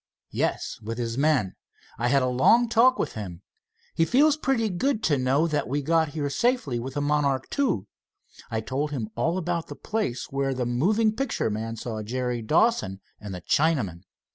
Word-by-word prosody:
"Yes, - - -2
with 115 +2 -5
his 115 -1 -2
men. 140 -8 +2 0.5
I 120 - +1
had 140 +1 +3
a - - +1
long 225 - +4
talk 240 +3 +4
with - - -2
him. 95 -5 -7 0.5
He 165 - +2
feels 285 - +4
pretty 270 -7 0
good 220 +5 -1
to 150 - +3
know 135 +5 +2
that 150 -3 -1
we 145 +3 -1
got 160 +2 +2
here 145 -2 0
safely 215 - 0
with 130 +3 -6
the 145 - 0
Monarch 145 -2 +1
II. 240 - +1 0.6
I 110 -1 -2
told 130 +7 -2
him 120 -7 -4
all 165 +10 0
about 175 -2 -2
the - - -8
place 135 - -2
where 135 -1 -1
the 125 -1 -1
moving 210 - +2
picture 265 - -1
man 110 +2 -3
saw 110 -1 -5
Jerry 125 +2 -2
Dawson 150 - +2 0.2
and 105 -1 -8
the 90 - -7
Chinaman. 135 - +1
140 Hz, 185 wpm, -26 LUFS, 120-180 Hz, 0.6 s, long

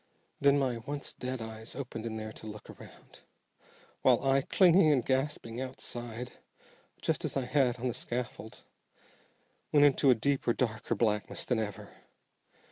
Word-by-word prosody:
Then 140 0 +5
my 130 -4 0
once 140 +5 -5
dead 125 -1 -4
eyes 110 0 -7
opened 125 -4 -5
in 110 - -4
there 110 0 -5
to 110 - -9
look 105 -1 -9
around, - - -15 0.8
while - - +4
I, 135 0 +4
clinging 175 +1 +5
and 130 -5 +2
gasping 130 -3 -1
outside, 120 -2 -6 0.6
just - - 0
as - - -2
I 130 - -1
had 125 -2 +2
on 125 - -1
the 120 - -1
scaffold, 120 -4 -5 1.1
went 145 -1 +6
into 140 0 +4
a 125 - +7
deeper, 135 0 +1
darker 115 -1 -1
blackness 105 -2 0
than 125 -3 +1
ever. 105 -3 -5
125 Hz, 150 wpm, -31 LUFS, 110-135 Hz, 1.1 s, a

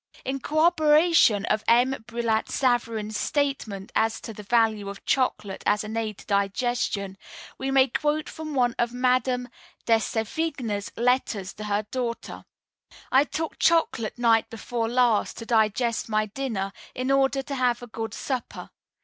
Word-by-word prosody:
In 270 +1 -2
corroboration 310 - +4
of 215 - 0
M. 245 +3 +5 0.2
Brillat 230 -2 -1
Savarin's 230 -4 0
statement 270 -9 -2
as 225 0 +1
to 225 - -7
the 210 - -9
value 215 -2 +1
of 200 - -10
chocolate 210 -7 0
as 210 +1 +2
an 215 +1 -6
aid 220 -3 -2
to - - -14
digestion, 200 -1 -1 0.4
we 265 - -2
may 270 0 +5
quote 300 +4 -1
from 310 -2 -6
one 245 -2 +2
of 240 0 0
Mme. 250 0 +3 0.7
de 230 -1 +5
Sévigné's 225 -2 -2
letters 235 -5 0
to 215 - -8
her 205 0 0
daughter: 240 -2 -4 0.7
"I 270 +2 +5
took 320 +1 -4
chocolate 290 -10 +2
night 230 -2 +3
before 230 0 -3
last 240 -3 +2
to 230 - -7
digest 225 +1 +1
my 215 0 +1
dinner, 210 -4 -3 0.2
in 255 +2 -1
order 270 0 +2
to 280 - -6
have 245 -2 0
a - - -5
good 225 -2 -6
supper. 260 -3 -5
235 Hz, 150 wpm, -25 LUFS, 215-265 Hz, 0.7 s, M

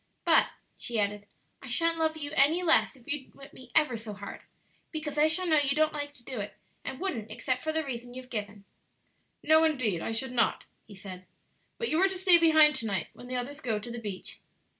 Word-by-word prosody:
But," - - +5 0.3
she 235 -2 -2
added, 205 0 -1 0.3
"I 265 - -10
sha'n't 330 +6 +2
love 315 0 0
you 290 -2 -5
any 315 +5 +3
less 320 -4 +4
if 250 -3 -21
you 295 -4 -4
whip 275 0 -14
me 255 -1 -14
ever 300 -6 +3
so 220 -1 -7
hard, 200 0 -8 0.5
because 305 -2 -5
I 300 +1 +4
shall 315 +4 +3
know 315 -3 +4
you 280 -1 +1
don't 310 0 +2
like 290 -1 -4
to 255 - -13
do 255 -2 -6
it, 205 0 -6 0.3
and 265 - -6
wouldn't 240 - -3
except 255 +4 -2
for 315 - -1
the 320 0 0
reason 245 -2 -6
you've 255 0 -10
given." 205 -2 -5 0.8
"No, 315 +1 +5
indeed, 255 - +1
I - - -3
should 245 +3 -1
not," 235 -3 +1 0.2
he 205 - -12
said; 185 -2 -10 0.5
"but 465 - -2
you 320 - +2
are 385 - +4
to 380 - -4
stay 365 -2 +7
behind 315 -2 +6
to 230 - -2
night 190 -6 -2
when 245 - -12
the 255 - -4
others 280 +4 -4
go 225 -4 -1
to 215 +3 -7
the 240 - -5
beach." 205 -4 -6
265 Hz, 225 wpm, -29 LUFS, 225-315 Hz, 0.8 s, stay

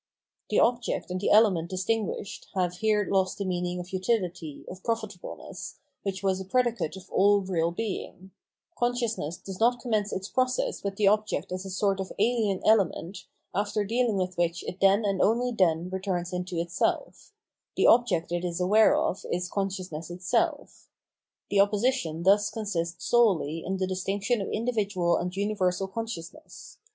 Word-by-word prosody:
The - - +3
object 240 -5 +1
and 185 0 -2
the - - +1
element 195 -6 +4
distinguished 215 +3 -2
have 180 -1 0
here 210 0 +1
lost 190 -1 +1
the 200 - -3
meaning 180 -1 -2
of 180 +2 -8
utility, 185 -6 -2
of 185 +1 -9
profitableness, 215 -5 -5 0.3
which 195 -1 -4
was 190 -1 +1
a - - -6
predicate 235 -5 0
of 190 0 -12
all 205 +1 +4
real 175 -3 0
being; 190 -1 -5 0.4
consciousness 235 -9 -1
does 190 -1 -8
not 240 +2 +3
commence 215 -5 -1
its 190 +1 -3
process 255 +2 0
with 200 -1 -2
the 205 0 +2
object 210 -5 +1
as 185 +1 -4
a - - -6
sort 195 +1 0
of 190 - -4
alien 215 -3 +1
element 195 -3 +1 0.3
after 205 +1 0
dealing 230 0 +1
with 185 -1 -2
which 170 0 0
it 185 - -6
then 195 +2 +4
and 195 -2 +1
only 245 +3 +2
then 175 -6 +2
returns 185 -2 -2
into 180 -1 -3
itself; 170 - -2 0.4
the - - +2
object 230 -9 +4
it 175 0 -1
is 175 -1 -2
aware 210 +5 +5
of 190 - -1
is 180 0 -2
conscious 195 -2 -2
ness 155 +2 -6
itself. 240 - -2 0.6
The 200 - +3
opposition 205 -5 +1
thus 205 +3 +4
consists 175 -5 -3
solely 180 -10 +2
in 190 +1 -2
the 190 - 0
distinction 195 +4 -1
of 195 - -3
individual 205 -7 0
and 180 +1 -3
universal 195 -2 0
consciousness. 230 - -8
195 Hz, 165 wpm, -27 LUFS, 180-220 Hz, 0.6 s, aware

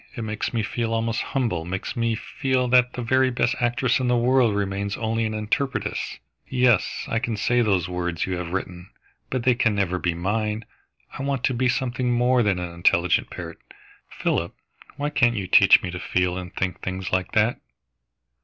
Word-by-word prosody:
"It 115 - -4
makes 110 -1 -3
me 115 -3 -1
feel 115 +1 -2
almost 115 0 -1
humble, 115 -12 -1
makes 95 +3 -4
me 115 -2 0
feel 130 +2 -1
that 125 0 +4
the 125 - -4
very 130 +2 +3
best 120 -1 +1
actress 120 +1 +1
in 130 - -1
the 125 0 +3
world 120 -2 +3
remains 100 0 -2
only 115 0 -1
an 110 0 -2
interpretress. 110 +5 -2 0.3
Yes, 125 -6 +2
I 115 - 0
can 115 -3 -3
say 120 +4 +2
those 95 -6 +1
words 90 -2 -2
you 95 - -2
have 90 -1 -4
written, 90 -1 -5 0.4
but 130 -2 -2
they 125 - +4
can 115 -3 +1
never 95 -2 0
be 90 -1 -1
mine. 105 +4 -2 0.5
I - - -6
want 135 -2 -2
to 130 - +2
be 125 +1 +1
something 125 0 -1
more 125 +1 +3
than 105 -4 +1
an 90 -1 -5
intelligent 85 0 +2
parrot, - - -8 0.5
Philip. - - -2 0.4
Why 145 0 -2
can't 120 -4 +3
you 100 -3 -2
teach - - +6
me 90 - -3
to 90 - -5
feel 90 -1 0
and 90 -1 -6
think 90 -1 -2
things 95 0 -4
like 95 -1 -1
that?" 110 +2 +2
115 Hz, 190 wpm, -24 LUFS, 95-125 Hz, 0.5 s, teach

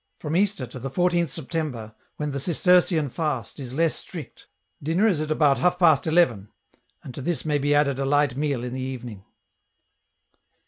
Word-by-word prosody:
From 155 +1 -4
Easter 195 -7 +1
to 125 +2 -10
the 135 +3 -5
14th 175 +2 +1
September, 130 -7 -5 0.2
when 150 -1 -3
the 140 - -3
Cistercian 175 0 +3
fast 140 -5 -3
is 130 -3 -6
less 165 +1 +2
strict, - - -10 0.3
dinner 165 +9 +2
is 175 -8 +1
at 155 - -3
about 150 -3 +3
half 180 0 +2
past 160 -5 +4
eleven, 125 - +2 0.5
and 130 - -9
to 140 - -7
this 170 +3 -2
may 150 -2 +1
be 145 +1 +2
added 140 -2 +2
a 135 - 0
light 145 -2 +2
meal 140 -3 -1
in 125 0 -5
the 130 - -4
evening." 125 -6 -6
145 Hz, 180 wpm, -24 LUFS, 130-165 Hz, 0.5 s, past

